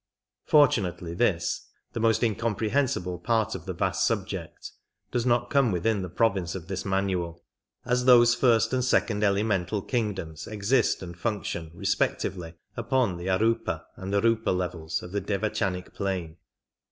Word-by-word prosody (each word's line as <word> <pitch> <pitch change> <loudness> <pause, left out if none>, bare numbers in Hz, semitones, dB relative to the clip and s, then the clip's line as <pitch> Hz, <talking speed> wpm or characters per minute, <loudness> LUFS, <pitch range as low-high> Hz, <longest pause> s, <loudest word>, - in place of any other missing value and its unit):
Fortunately 100 - +3
this, 85 -4 0 0.3
the - - -3
most 115 +1 +2
incomprehensible 110 -3 0
part 110 +2 +1
of 95 -1 -7
the 95 - -2
vast 85 - 0
subject, - - -3 0.4
does 120 0 0
not 120 0 +1
come 135 -5 +3
within 100 +4 0
the 90 - -5
province 95 -3 0
of 90 -2 -7
this 95 -1 -3
manual, 95 -3 -1 0.4
as 125 0 +1
those 120 -2 +7
first 115 -2 +3
and 130 -1 +1
second 110 -4 +1
elemental 100 -1 +1
kingdoms 95 - -3
exist 110 +2 +1
and 85 -1 -8
function 90 -4 -3
respectively 85 0 -1 0.2
upon 125 -9 0
the 85 +2 -6
arupa 95 -4 +1
and 95 0 -6
riipa 110 -1 +2
levels 85 -3 -3
of 90 - -9
the 100 +1 -1
devachanic 95 -3 -2
plane. 90 -5 -3
100 Hz, 140 wpm, -27 LUFS, 90-115 Hz, 0.4 s, those